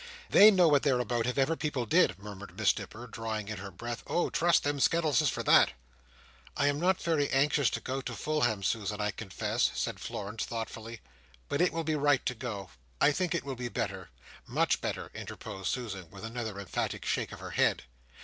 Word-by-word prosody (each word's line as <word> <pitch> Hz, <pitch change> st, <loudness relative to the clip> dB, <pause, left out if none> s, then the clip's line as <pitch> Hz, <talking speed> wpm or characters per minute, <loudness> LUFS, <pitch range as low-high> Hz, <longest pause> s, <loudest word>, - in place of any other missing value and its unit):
"They 210 Hz, -, +9 dB
know 185 Hz, -5 st, +5 dB
what 145 Hz, -3 st, +5 dB
they're 135 Hz, -4 st, +2 dB
about, 120 Hz, 0 st, 0 dB
if 125 Hz, -, -2 dB
ever 140 Hz, +4 st, +2 dB
people 145 Hz, -4 st, -2 dB
did," 95 Hz, -4 st, +3 dB
murmured 100 Hz, 0 st, -10 dB
Miss -, -, +3 dB
Nipper, 120 Hz, +3 st, -8 dB
drawing 110 Hz, -3 st, -4 dB
in 110 Hz, -, -4 dB
her 100 Hz, +1 st, -7 dB
breath 120 Hz, +6 st, -6 dB
"oh! 175 Hz, -, 0 dB
trust 170 Hz, 0 st, +3 dB
them 145 Hz, 0 st, -1 dB
Skettleses 155 Hz, -1 st, +3 dB
for -, -, -3 dB
that!" -, -, +6 dB, 0.8 s
"I 145 Hz, -, +2 dB
am 145 Hz, 0 st, +2 dB
not 185 Hz, +2 st, +2 dB
very 155 Hz, -4 st, +1 dB
anxious 140 Hz, 0 st, +3 dB
to -, -, -3 dB
go 135 Hz, +1 st, -3 dB
to -, -, -5 dB
Fulham, 150 Hz, -10 st, 0 dB
Susan, 105 Hz, 0 st, -1 dB
I 105 Hz, 0 st, 0 dB
confess," 95 Hz, -1 st, -1 dB
said -, -, -2 dB
Florence 105 Hz, +2 st, -4 dB
thoughtfully: 115 Hz, 0 st, -6 dB, 0.5 s
"but -, -, 0 dB
it 180 Hz, -, +4 dB
will 165 Hz, 0 st, -2 dB
be 155 Hz, 0 st, 0 dB
right 145 Hz, -2 st, +2 dB
to -, -, 0 dB
go. 110 Hz, -6 st, -6 dB, 0.3 s
I 150 Hz, -, +5 dB
think 180 Hz, +3 st, 0 dB
it 170 Hz, -, -1 dB
will 140 Hz, -, -4 dB
be 120 Hz, 0 st, -4 dB
better." 95 Hz, -3 st, -4 dB, 0.4 s
"Much -, -, +1 dB
better," -, -, -4 dB
interposed 95 Hz, -1 st, -7 dB
Susan, 100 Hz, -9 st, -5 dB
with 100 Hz, +4 st, -9 dB
another 110 Hz, -3 st, -5 dB
emphatic 100 Hz, -3 st, -3 dB
shake -, -, -1 dB
of -, -, -9 dB
her -, -, -7 dB
head. -, -, +2 dB
125 Hz, 200 wpm, -30 LUFS, 105-145 Hz, 0.8 s, They